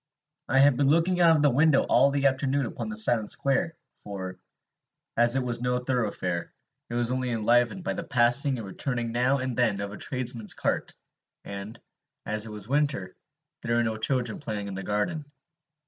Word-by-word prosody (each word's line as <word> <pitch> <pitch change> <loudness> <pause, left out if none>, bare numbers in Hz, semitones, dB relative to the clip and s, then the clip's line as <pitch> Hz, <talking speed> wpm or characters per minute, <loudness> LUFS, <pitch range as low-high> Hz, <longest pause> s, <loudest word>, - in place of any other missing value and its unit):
I 135 - +2
had 135 -1 +6
been 140 - +2
looking 170 +4 +3
out 165 -1 +6
of 150 - +2
the 145 - +5
window 145 +2 +4
all 135 +3 +4
the 140 0 -1
afternoon 135 0 +2
upon 120 - -5
the 215 - -4
silent 120 - +2
square, 140 +5 0 0.2
for, 95 -2 -7 0.8
as 120 +1 +4
it 135 - +1
was 120 -1 -2
no 125 0 +1
thoroughfare, 110 -9 -2 0.4
it 120 - -4
was 120 0 0
only 130 0 -1
enlivened 120 - +2
by 190 - -1
the 170 - -4
passing 125 0 +2
and 115 - -6
returning 120 +4 -3
now 125 +4 +2
and 130 -2 -3
then 110 -5 +1
of 100 0 -4
a 105 - -8
tradesman's 120 -4 -3
cart; - - -2 0.5
and, 100 +2 -7 0.5
as 110 +1 -2
it - - -8
was 105 -1 -7
winter, 140 -9 0 0.5
there 115 0 -1
were 120 - +3
no 110 -1 -1
children 120 0 -1
playing 105 -7 -4
in 100 - -5
the 95 - -4
garden. 105 - -1
125 Hz, 190 wpm, -27 LUFS, 110-140 Hz, 0.8 s, had